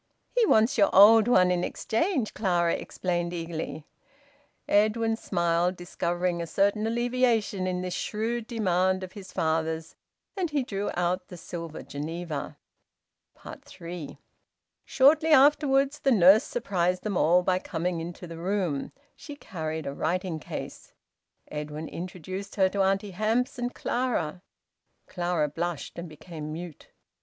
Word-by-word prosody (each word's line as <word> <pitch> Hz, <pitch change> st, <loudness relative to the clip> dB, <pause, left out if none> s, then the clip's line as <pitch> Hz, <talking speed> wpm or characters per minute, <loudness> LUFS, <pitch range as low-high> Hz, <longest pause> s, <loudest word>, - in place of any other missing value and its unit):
"He 475 Hz, -3 st, +4 dB
wants 220 Hz, -2 st, +3 dB
your 200 Hz, -, +5 dB
old 215 Hz, +3 st, +8 dB
one 185 Hz, -7 st, +5 dB
in 180 Hz, -1 st, 0 dB
exchange," 265 Hz, -, -1 dB
Clara 175 Hz, -5 st, +1 dB
explained 175 Hz, -1 st, -2 dB
eagerly. 165 Hz, -2 st, -5 dB, 0.8 s
Edwin 220 Hz, +2 st, +2 dB
smiled, 175 Hz, -3 st, 0 dB
discovering 175 Hz, 0 st, -2 dB
a 170 Hz, -, -4 dB
certain 200 Hz, +5 st, +1 dB
alleviation 235 Hz, -5 st, +1 dB
in 180 Hz, 0 st, -2 dB
this 180 Hz, -1 st, -3 dB
shrewd 225 Hz, +4 st, -2 dB
demand 185 Hz, -4 st, +1 dB
of 185 Hz, -, -7 dB
his 190 Hz, -2 st, -11 dB
father's, 160 Hz, 0 st, -1 dB, 0.4 s
and 370 Hz, -4 st, -1 dB
he 290 Hz, -3 st, 0 dB
drew 200 Hz, -4 st, -3 dB
out 180 Hz, +1 st, -1 dB
the 180 Hz, -, -10 dB
silver 165 Hz, -1 st, -7 dB
Geneva. 160 Hz, +1 st, -5 dB, 1.1 s
THREE. 170 Hz, -3 st, -8 dB, 0.7 s
Shortly 305 Hz, +4 st, +4 dB
afterwards 280 Hz, -1 st, +4 dB
the 270 Hz, -, +2 dB
nurse 205 Hz, +3 st, +6 dB
surprised 185 Hz, -, -1 dB
them 210 Hz, -3 st, -2 dB
all 175 Hz, +2 st, +4 dB
by 185 Hz, 0 st, +1 dB
coming 170 Hz, -1 st, -3 dB
into 175 Hz, +2 st, -7 dB
the 165 Hz, -1 st, -9 dB
room. 180 Hz, -5 st, -1 dB, 0.2 s
She 290 Hz, -, -10 dB
carried 160 Hz, -, -5 dB
a 140 Hz, -, -3 dB
writing 175 Hz, +2 st, -2 dB
case. -, -, -8 dB, 0.6 s
Edwin 150 Hz, +1 st, -5 dB
introduced 185 Hz, +3 st, -7 dB
her 190 Hz, -2 st, +3 dB
to 200 Hz, +1 st, -1 dB
Auntie 195 Hz, +1 st, +1 dB
Hamps 230 Hz, +7 st, 0 dB
and 245 Hz, 0 st, -2 dB
Clara. 205 Hz, -10 st, -1 dB, 0.6 s
Clara 175 Hz, -4 st, -1 dB
blushed 170 Hz, +2 st, -4 dB
and 170 Hz, 0 st, -7 dB
became 155 Hz, 0 st, -8 dB
mute. 165 Hz, 0 st, -8 dB
185 Hz, 135 wpm, -27 LUFS, 170-220 Hz, 1.1 s, old